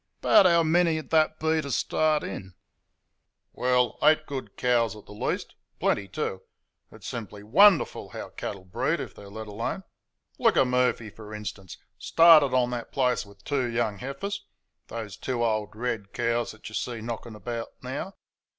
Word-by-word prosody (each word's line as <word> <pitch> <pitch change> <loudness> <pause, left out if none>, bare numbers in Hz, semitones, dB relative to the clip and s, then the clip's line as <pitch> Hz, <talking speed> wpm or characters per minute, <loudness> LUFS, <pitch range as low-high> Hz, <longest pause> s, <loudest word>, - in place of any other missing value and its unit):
"'Bout 190 - +6
how 170 -1 +4
many'd 160 -1 +2
that 155 -1 +3
be 160 0 +1
t' 140 - -6
start 155 +3 +1
'n?" 95 -2 -7 1.0
"Well, 125 -2 +1
EIGHT 155 0 +4
good 135 -3 -6
cows 120 -4 +2
at 105 - -13
the - - -14
least 105 - -3 0.3
plenty, 100 - +1
too. 95 0 -3 0.5
It's - - -14
simply 105 -3 -6
WONDERFUL 185 - +4
how - - -7
cattle 95 -2 -6
breed 90 - -1
if - - -6
they're 100 -1 -12
let 110 +2 -7
alone. 115 - -4 0.6
Look - - +3
at - - +6
Murphy, 125 -3 +1
for 105 -1 -10
instance. 100 -3 -7 0.2
Started 165 -5 +6
on 125 -1 +2
that 120 -1 -5
place 125 -5 +1
with 100 0 -18
two 135 -2 0
young 115 -4 -1
heifers 165 +10 -5 0.4
those 110 -4 -6
two 125 -3 -2
old 110 -2 -1
red 110 -4 -3
cows 120 0 0
that 110 - -12
you 110 - -9
see 120 +1 -3
knocking 115 0 -6
about 115 +2 -5 0.2
now. 140 +9 -5
120 Hz, 165 wpm, -27 LUFS, 105-145 Hz, 1.0 s, Bout